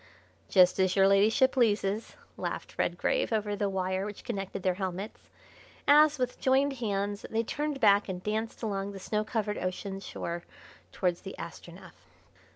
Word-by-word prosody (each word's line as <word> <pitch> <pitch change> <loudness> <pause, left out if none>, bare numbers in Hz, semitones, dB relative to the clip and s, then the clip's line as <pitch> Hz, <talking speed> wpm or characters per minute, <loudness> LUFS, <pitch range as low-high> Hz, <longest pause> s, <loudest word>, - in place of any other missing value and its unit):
"Just 185 -1 +5
as 185 -1 +2
your 195 -1 +5
Ladyship 215 +7 +4
pleases," 215 -3 +1 0.2
laughed - - -5
Redgrave - - 0
over 210 -2 0
the 205 -1 0
wire 190 0 -1
which 205 0 -7
connected 195 -5 -4
their 185 - +2
helmets, 190 +2 -5 0.6
as, 300 +1 +6
with 250 -1 -2
joined 270 +2 +3
hands, 205 -3 -2
they 225 +1 0
turned 295 +4 -3
back 200 -3 +4
and 180 -1 -5
danced 220 +2 -3
along 200 -2 -2
the 195 - -8
snow 210 +2 -1
covered 215 -2 -2
ocean 190 +1 -4
shore 175 -2 -5 0.5
towards 180 -2 -1
the 195 - -8
Astronef. 175 +1 -10
205 Hz, 155 wpm, -29 LUFS, 190-225 Hz, 0.6 s, as